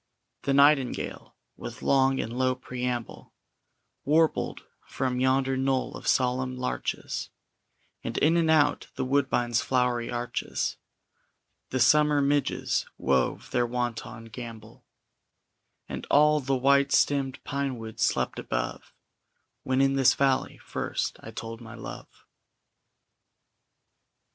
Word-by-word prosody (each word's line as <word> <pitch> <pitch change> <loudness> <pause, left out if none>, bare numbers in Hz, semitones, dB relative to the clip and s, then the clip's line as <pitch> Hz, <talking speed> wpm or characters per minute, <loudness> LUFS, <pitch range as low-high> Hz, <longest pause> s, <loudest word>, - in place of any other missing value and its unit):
The 140 - 0
nightingale, 140 -2 +2 0.2
with 120 +2 -8
long 135 -1 +3
and 115 +2 -3
low 130 0 +1
preamble, 125 -1 -5 0.7
Warbled 160 +2 +1 0.2
from 130 -1 -2
yonder 130 +1 +2
knoll 130 0 0
of - - -8
solemn 130 0 +1
larches, 125 0 -3 0.7
And - - -4
in 160 +3 +4
and 165 -2 +2
out 145 -2 +3
the - - -2
woodbine's 130 -3 +1
flowery 125 -3 0
arches 120 0 -3 0.9
The 130 - -1
summer 150 +3 +5
midges 140 0 0
wove 65 -1 0
their 120 -1 +1
wanton 115 -2 -4
gambol, 115 -2 -9 1.0
And - - -6
all 150 +1 +5
the 135 -1 0
white 140 +2 +3
stemmed 135 -2 +2
pinewood 130 -6 -4
slept - - 0
above - - -4 0.7
When 130 +1 +1
in 135 0 +3
this 130 -1 +5
valley 135 -1 +1
first - - -3
I - - -10
told 115 +1 -7
my 115 0 -10
love. 115 - -10
130 Hz, 115 wpm, -27 LUFS, 120-140 Hz, 1.0 s, summer